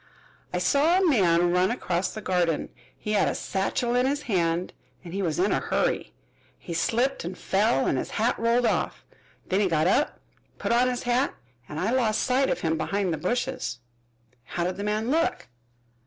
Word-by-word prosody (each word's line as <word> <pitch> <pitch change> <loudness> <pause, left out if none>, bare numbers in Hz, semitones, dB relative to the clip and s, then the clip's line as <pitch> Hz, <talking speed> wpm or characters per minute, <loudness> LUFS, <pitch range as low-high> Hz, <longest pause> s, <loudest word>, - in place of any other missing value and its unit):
"I - - -1
saw 315 +5 +3
a 380 -1 +3
man 175 - +3
run 180 +1 +3
across 185 -6 -1
the 215 - -7
garden. 175 -4 0 0.3
He 210 - -5
had 205 -2 +3
a - - -1
satchel 215 +5 -1
in 250 +1 +3
his 285 +2 -1
hand 175 -4 0 0.3
and 170 - -9
he 200 - -2
was 165 -5 -1
in 190 +3 +2
a - - +2
hurry. - - -1 0.5
He 170 - -7
slipped 240 +10 0
and 180 +2 -5
fell 190 -3 +1
and 130 - +1
his - - -4
hat 230 +3 +1
rolled 235 +2 +2
off. - - -1 0.4
Then 190 - 0
he 205 - +3
got 160 -3 +1
up, 240 +11 +1 0.4
put - - -2
on 245 +2 +4
his 250 -1 -3
hat, 245 +3 +1 0.3
and 150 - -5
I 205 +7 0
lost 235 -4 +1
sight 260 +2 +2
of - - -1
him 160 -1 0
behind 195 +2 0
the - - -2
bushes." 245 - -2 0.7
"How 170 - -3
did 180 +1 -2
the 200 - -4
man 215 +4 -1
look?" 330 - 0
205 Hz, 195 wpm, -26 LUFS, 175-245 Hz, 0.7 s, on